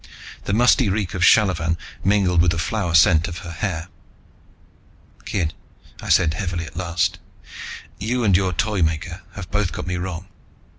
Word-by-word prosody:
The 100 - -1
musty 120 0 +4
reek 95 -2 -1
of 95 - -3
shallavan 90 -4 +4 0.3
mingled 95 -3 +3
with 90 - +3
the 80 - 0
flower 90 -1 -1
scent 80 +1 +5
of 85 -2 -6
her 85 - -6
hair. 85 -1 -3 1.4
"Kid," 85 -6 -1 0.5
I - - -7
said 80 -3 +4
heavily 90 -3 -3
at 80 - -12
last, 90 -1 -1 0.8
"you 120 +4 -1
and 100 -4 +4
your 95 0 +2
Toymaker 85 -1 -1
have 90 -4 -8
both 105 -5 0
got - - -5
me 90 0 -2
wrong. 90 0 -5
90 Hz, 155 wpm, -22 LUFS, 85-100 Hz, 1.4 s, scent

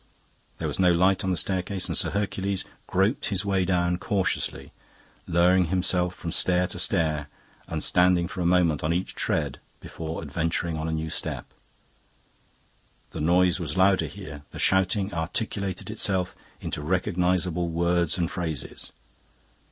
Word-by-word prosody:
There - - -3
was - - -4
no 90 -1 +5
light 95 +2 +3
on 95 - 0
the 90 - +1
staircase, 95 0 -1
and - - -2
Sir - - +2
Hercules 100 -1 -2 0.2
groped 95 +7 +1
his 100 -1 -1
way 95 -2 +1
down 90 -1 +1
cautiously, 95 0 -1 0.5
lowering 90 +2 +4
himself 90 0 +1
from 85 - -5
stair 90 +1 +3
to - - -3
stair 75 -3 +1 0.4
and - - -2
standing 90 -1 +3
for 90 +1 -5
a - - 0
moment 85 -4 +3
on 80 +2 +1
each 90 +2 -2
tread - - -1 0.2
before 80 0 -6
adventuring 80 +2 -1
on 80 0 -3
a - - -1
new 80 0 -2
step. - - -2 1.7
The 80 - -5
noise 90 +3 +3
was 80 -3 -4
louder 95 0 +4
here; 85 -8 -9
the - - -10
shouting 95 +1 +2
articulated 95 +4 -2
itself 95 -4 0 0.3
into - - -3
recognisable 90 +1 +1
words 85 0 +1
and 85 -1 -1
phrases. 80 -7 -4
90 Hz, 150 wpm, -26 LUFS, 85-95 Hz, 1.7 s, no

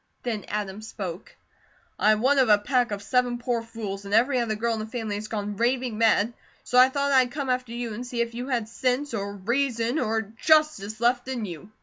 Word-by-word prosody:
Then 225 -4 -3
Adam 205 -1 -4
spoke: 195 -4 -7 0.6
"I 215 - +5
am 215 - -1
one 275 +3 +4
of 255 -4 +4
a 210 - +7
pack 245 +3 +1
of 200 -1 -4
seven 245 +3 +1
poor 240 -1 -1
fools, 220 -4 -6
and 200 +1 -1
every 250 +3 +3
other 225 -2 -1
girl 230 +2 0
in 225 - -3
the 215 - -4
family 225 -2 -4
has 210 +1 -4
gone 205 -2 -4
raving 245 0 0
mad, 225 0 +3 0.3
so 250 - +3
I 255 +1 +8
thought 280 +1 0
I'd 260 -2 +5
come 275 0 -4
after 250 -2 -2
you, 235 -1 -4
and 235 +4 -5
see 245 -1 -5
if 235 0 0
you 245 +2 -5
had 240 -5 -1
sense, 255 +4 -1
or 200 -2 -3
reason, 235 +4 0
or 220 -2 0
justice, 225 -2 +1
left 245 +1 +2
in 250 -4 -3
you." 180 +1 -8
235 Hz, 225 wpm, -26 LUFS, 210-250 Hz, 0.6 s, I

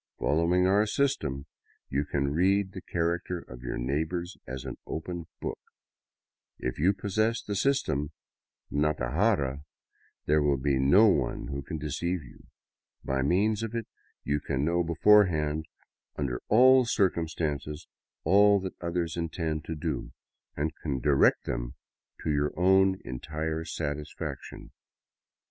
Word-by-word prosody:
Followiru 85 +4 +2
our 100 +3 +3
system, 80 - 0 0.4
you 70 +2 -1
can 70 -1 -1
read 95 +3 +2
the 95 - -8
character 85 +1 -1
of 60 -7 -11
your 60 - -4
neighbors 80 +8 -2
as 65 0 -6
an - - -5
open 85 +1 -5
book; - - -4 1.0
\i - - -8
yna 95 +6 +2
possess 110 +4 0
the 105 - -4
system 95 - +1 0.3
" - - -50
Natajara," 75 - +1 0.6
there 75 +1 +3
will 70 -2 +2
be 65 0 +1
no 90 +12 +6
one 70 - +1
who 70 0 -3
can 80 +4 -5
deceive 80 +4 -2
you: 60 - -16 0.6
by 65 0 -1
m^'^ns 100 +9 +2
of 115 0 -4
it 115 -2 -2 0.4
you 75 0 0
can 70 -1 -1
know 85 +2 +2
beforehand 80 -4 +3 0.5
under 65 -4 -2
all 130 +4 +7
circumstances 80 - -1 0.4
all 100 +4 +5
that 95 -1 -6
othetNi 85 -1 -2
<nte»(i 80 -2 -2
to 80 - -5
do, 65 -4 -4 0.4
and 75 +2 -1
can 70 -4 -3
direct 70 +2 +3
them - - -4 0.5
to 80 - 0
your 75 +2 0
own 95 +1 +4
entire 80 +5 -3
satisfaction. 75 -2 -5
80 Hz, 135 wpm, -28 LUFS, 70-95 Hz, 1.0 s, all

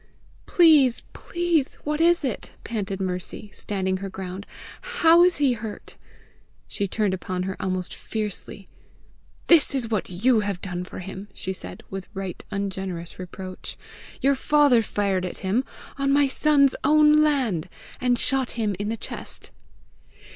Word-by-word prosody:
"Please, 300 -8 +5
please, 340 -5 -1
what 300 +1 -1
is 345 -1 +4
it?" 260 -5 -3
panted 200 -4 -3
Mercy, 185 +2 -4
standing 190 -2 -2
her 195 +1 -5
ground. 190 +1 -7 0.3
"How 345 -8 +5
is 360 0 +4
he 280 -3 +3
hurt?" 220 -2 -7 0.7
She 200 - -2
turned 205 0 0
upon 185 0 -3
her 190 0 -3
almost 185 -1 -2
fiercely. 210 -2 -5 0.8
"This 320 -4 +5
is 235 -4 -2
what 215 -4 -1
YOU 220 +7 +3
have 200 -3 -2
done 180 -1 -4
for - - -10
him!" 190 +2 -7
she 190 - -3
said, - - -7
with 190 -1 -5
right 190 -2 -5
ungenerous 190 -4 -4
reproach. 185 0 -8 0.4
"Your 275 +1 +4
father 285 -3 +4
fired 200 -3 -1
at 180 - -4
him, 215 +7 +2 0.4
on 275 0 +2
my 285 0 +5
son's 280 0 +3
own 300 +1 +6
land, 260 - +1 0.3
and 250 -1 +2
shot 260 0 0
him 210 -3 0
in 205 +1 -2
the 225 - -2
chest." - - -5
215 Hz, 145 wpm, -24 LUFS, 190-280 Hz, 0.8 s, own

